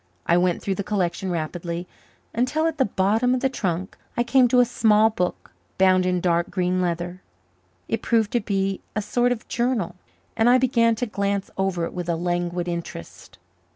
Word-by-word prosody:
I 170 - +3
went 175 0 +1
through 195 - 0
the 200 - -3
collection 190 -2 -1
rapidly, 170 +1 -4 0.5
until 255 +7 0
at 320 -2 -1
the 265 - +4
bottom 215 +6 +1
of 250 - -2
the 265 - +2
trunk, 190 -7 -3 0.2
I 240 - +3
came 255 +1 +4
to 250 +1 +3
a 245 - +6
small 220 -2 +3
book 180 -4 -3 0.3
bound 185 -1 +4
in 180 0 +1
dark 170 -1 +1
green 185 -1 0
leather. 175 +1 -3 0.7
It 225 - -2
proved 225 -3 +1
to 240 - +2
be 195 -2 -1
a 215 - 0
sort 245 +4 +1
of 240 -3 -3
journal, 235 -6 -1 0.4
and 225 +2 +3
I 250 - +6
began 235 -3 +3
to 245 - -2
glance 200 -2 -2
over 190 -3 0
it - - -7
with 175 -1 -4
a 170 - +1
languid 175 +1 -2
interest. 170 - -7
195 Hz, 190 wpm, -23 LUFS, 175-235 Hz, 0.7 s, a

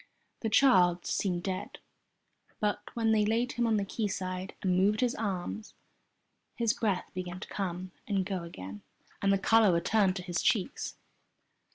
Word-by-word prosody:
The 225 - -1
child 185 -8 +5
seemed 175 -3 -1
dead, 185 -1 -4 0.8
but 210 -1 0
when 225 -1 +2
they 215 -1 +4
laid 230 +4 +1
him 240 -1 0
on 220 -1 +3
the 200 - 0
quayside, 190 -3 -3
and 185 -2 +2
moved 200 +5 +3
his 250 -1 +2
arms, 210 +1 -4 0.8
his 230 -2 +2
breath 200 -5 -1
began 180 0 -5
to - - -8
come 185 -1 -4 0.2
and 195 -3 0
go 190 -2 -2
again 100 - -8 0.4
and 195 - +3
the 195 - +4
colour 220 +1 +5
returned 185 +3 +2
to 180 - -5
his 175 -2 -2
cheeks. 230 +4 0
195 Hz, 160 wpm, -30 LUFS, 180-220 Hz, 0.8 s, child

